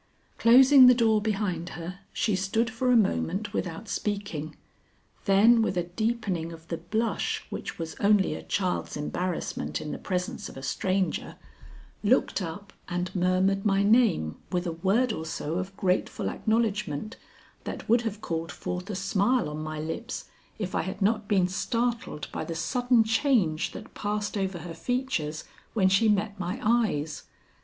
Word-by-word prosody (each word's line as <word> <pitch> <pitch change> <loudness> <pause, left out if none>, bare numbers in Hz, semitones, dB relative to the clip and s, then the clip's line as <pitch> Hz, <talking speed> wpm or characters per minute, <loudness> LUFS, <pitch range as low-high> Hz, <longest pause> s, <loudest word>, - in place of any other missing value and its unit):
Closing 260 +3 +8
the 250 - +8
door 220 -3 +3
behind 195 -5 -1
her, 175 +3 -7
she 215 - 0
stood 220 +5 0
for 250 +3 +1
a - - +5
moment 200 -1 0
without 180 +4 -3
speaking, 200 -8 -3 0.7
then 220 +4 +6
with 205 -4 0
a 175 - +2
deepening 190 -3 -2
of 165 0 -12
the 165 - -2
blush 220 +7 -1
which - - -5
was 165 -2 -5
only 205 -1 +3
a - - -6
child's 185 -5 -2
embarrassment 175 +4 -3
in 150 - -5
the - - -5
presence 180 -1 -3
of - - -11
a 135 - -8
stranger, 185 +7 -1 0.7
looked 220 -1 +2
up 190 +4 -6 0.2
and 180 +1 -2
murmured 185 +2 +2
my 200 -1 +3
name 205 - +3
with 180 -1 0
a 170 - -1
word 200 +9 +1
or 160 - -4
so 160 +1 -3
of 190 +1 -6
grateful 185 -2 0
acknowledgment 215 -5 -1 0.5
that - - -6
would 235 +2 +4
have 215 -2 -4
called 165 -3 -3
forth 180 +3 -5
a 205 - -3
smile 200 +5 +1
on 150 +1 -5
my 155 0 -4
lips 165 +11 -4 0.3
if 195 -4 -4
I - - +1
had 190 +2 -4
not 215 0 +1
been 190 -3 +3
startled 230 -1 -2
by - - -3
the 165 +1 -5
sudden 245 +6 +2
change 220 - +2
that - - -10
passed 210 0 -2
over 190 -2 -1
her 170 - -6
features 165 - -2 0.3
when 190 -4 +4
she 215 +4 +4
met 205 0 0
my 185 +7 -3
eyes. 210 -10 +1
195 Hz, 165 wpm, -27 LUFS, 175-225 Hz, 0.7 s, Closing